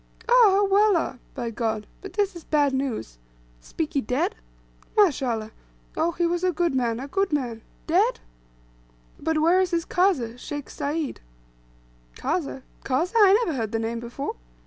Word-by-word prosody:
"Ah, 475 - +3
ah, 410 -5 +6
Wallah 395 -9 +3 0.2
(by 240 -3 -3
God), 220 -1 -2 0.2
but 390 - -9
this 405 -2 0
is 340 - -9
bad 290 -3 +2
news. 250 - -3 0.4
Spiki 300 -4 -2
dead? 250 +3 0 0.6
Mash 375 -11 +4
Allah! 225 -4 -2 0.4
Ough, 335 +2 +1
he 345 - +2
was 345 +1 0
a 365 - +3
good 345 -2 0
man 240 -3 0
a 270 - -5
good 390 +5 0
man! 245 -6 -2 0.2
Dead!" - - +2 1.0
"But 320 +1 0
where 340 +4 +4
is 370 - +1
this 340 -2 -1
Kazeh, 265 - +1
Sheikh 290 +2 -6
Sayd?" 295 0 -3 0.9
"Kazeh? 275 - -2 0.2
Kazeh? 310 - 0
I 420 +1 +6
never 320 - -2
heard 225 -4 -2
the - - +2
name 225 +1 -2
before." 240 +4 -5
295 Hz, 160 wpm, -25 LUFS, 245-365 Hz, 1.0 s, ah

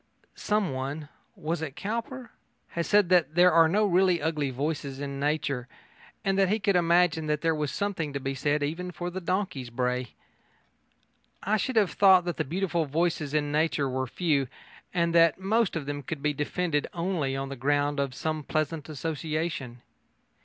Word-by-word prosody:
Someone 150 -7 -2 0.3
was 160 +2 -3
it 145 -4 -5
Cowper? 235 +4 -4 0.4
has 170 0 -3
said 205 -4 +4
that 175 -4 +3
there 180 +1 +6
are 165 -1 +6
no 210 +5 +3
really 185 -2 +3
ugly 150 -3 -1
voices 140 0 -3
in 140 -1 -4
nature, 140 -4 -1 0.6
and 195 0 +2
that 195 -2 +4
he 210 - +2
could 200 -2 +1
imagine 170 -2 +3
that 150 0 0
there 165 -1 +2
was 150 -2 -2
something 190 -7 -2
to 140 - -3
be 135 0 -3
said 145 +2 0
even 165 +5 -3
for 175 0 -5
the 190 +1 -5
donkey's 180 -8 -2
bray. 125 0 -2 1.3
I 210 +3 +2
should 260 +4 -2
have 210 -5 +3
thought 190 -3 +6
that 175 - -3
the 155 - +1
beautiful 170 +2 -1
voices 155 -1 -1
in 145 -1 +1
nature 150 -2 +1
were 130 0 -2
few, 145 -2 0 0.4
and 170 -1 +1
that 165 0 +5
most 215 +2 +1
of 155 -4 -3
them 145 0 -4
could 140 +1 -6
be 150 0 +2
defended 150 +1 -1
only 170 -6 -1
on 135 0 -3
the 140 - -5
ground 145 +2 +1
of 135 -2 -1
some 155 +1 -2
pleasant 155 +1 -2
association. 155 -4 -3
160 Hz, 175 wpm, -27 LUFS, 145-180 Hz, 1.3 s, there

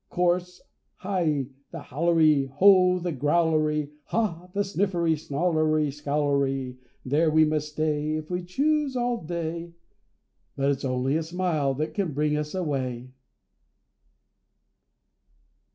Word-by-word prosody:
Chorus.—Hi! 180 -2 -2 0.2
the - - -8
Howlery! 155 -2 +2
ho! 180 +4 +5
the 175 -1 -3
Growlery! 150 0 +1
Ha! 180 -4 -2
the 205 +2 0
Sniffery, 185 -4 0
Snarlery, 155 -1 0
Scowlery! 140 -3 -1 0.3
There 150 +5 +2
we 155 0 +5
may 155 0 +1
stay, 150 0 -2
If 155 +2 -6
we 180 0 -1
choose, 285 +8 0
all 240 -4 -1
day; 170 0 -4 0.8
But 140 +1 +1
it's 140 0 -3
only 130 +3 0
a - - -1
smile 160 -5 -1
that 155 +3 -3
can 190 -7 -2
bring 150 +1 +1
us 150 +3 -3
away. 130 -7 -3
155 Hz, 115 wpm, -26 LUFS, 145-180 Hz, 0.8 s, ho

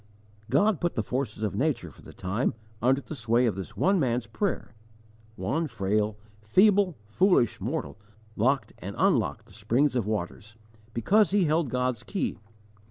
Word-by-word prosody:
God 185 - +3
put 175 -1 0
the 110 - 0
forces 120 -2 -3
of 105 - -1
nature 120 - -1
for - - -18
the - - -12
time 100 +6 -2 0.3
under 130 +4 +3
the 155 - -8
sway 120 -2 +2
of 110 -6 +1
this 95 -1 -7
one 190 0 +3
man's 125 -4 0
prayer 170 - -3 0.6
one 160 +7 -1
frail, 105 -2 -1 0.2
feeble, 190 - +4
foolish 125 - +2
mortal 75 +6 -3 0.4
locked 130 +5 +1
and 100 +2 -6
unlocked 130 - +1
the 100 - -19
springs 120 +7 +1
of 115 -5 0
waters, 105 +1 -4 0.4
because 200 - +4
he 200 0 +3
held 155 -2 +1
God's 125 -2 -1
key. 200 - -3
125 Hz, 160 wpm, -27 LUFS, 105-160 Hz, 0.6 s, feeble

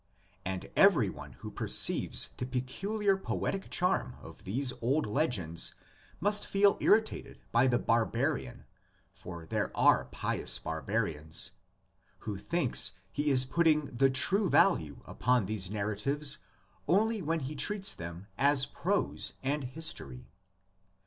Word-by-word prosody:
And 95 0 -5
every - - +5
one - - -10
who - - -9
per - - -4
ceives - - +3
the 125 - -4
peculiar 195 - -1
poetic 195 0 -3
charm 180 +1 0
of - - -13
these 125 +6 0
old 135 +6 +1
legends 105 - -1 0.4
must 205 +3 +2
feel 200 0 +4
irritated 220 +1 +1
by 120 +3 +4
the 120 -1 +3
barbarian 120 +2 -1 0.2
— 95 0 -38
for 85 -3 -8
there - - -2
are - - +4
pious 60 - -1
barbarians 80 - -3 0.3
— - - -39
who 105 -3 -5
thinks 130 - +2 0.2
he 145 +7 -1
is 130 -2 +5
putting 155 -1 +1
the 135 +2 +4
true 190 +9 +1
value 140 - +2
upon 125 -3 +1
these 95 -2 -2
narratives 110 +9 -1 0.5
only 215 +4 +2
when 165 0 -1
he 135 +3 -5
treats 195 +7 -1
them 85 +2 -8
as 140 -1 +4
prose 190 +7 -1
and 140 +1 -1
history. 125 - -4
130 Hz, 135 wpm, -31 LUFS, 100-165 Hz, 0.5 s, every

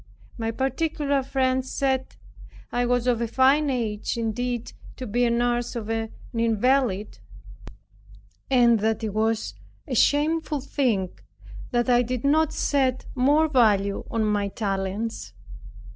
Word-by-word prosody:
My 225 -1 -3
particular 280 +3 -1
friends 260 -1 0
said, 265 -1 -1 0.6
"I 245 0 0
was 245 -1 +1
of 240 -2 +1
a 235 - 0
fine 270 +5 +3
age 230 -3 -2
indeed 235 +1 -3 0.2
to 255 - -6
be 245 +3 +1
a - - +2
nurse 240 0 0
to 235 -3 -4
an 225 0 -2 0.2
invalid, 230 - +1 1.3
and 240 -3 +4
that 220 +1 0
it 215 -2 -2
was 220 +1 0 0.3
a 270 - -4
shameful 300 +4 +2
thing 250 -9 0 0.6
that 240 -1 0
I 245 -1 +4
did 245 0 -3
not 310 +2 +3
set 260 -3 0
more 290 +5 +3
value 210 -8 +2
on 225 -1 0
my 205 -1 0
talents." 195 - -3
245 Hz, 130 wpm, -25 LUFS, 225-265 Hz, 1.3 s, and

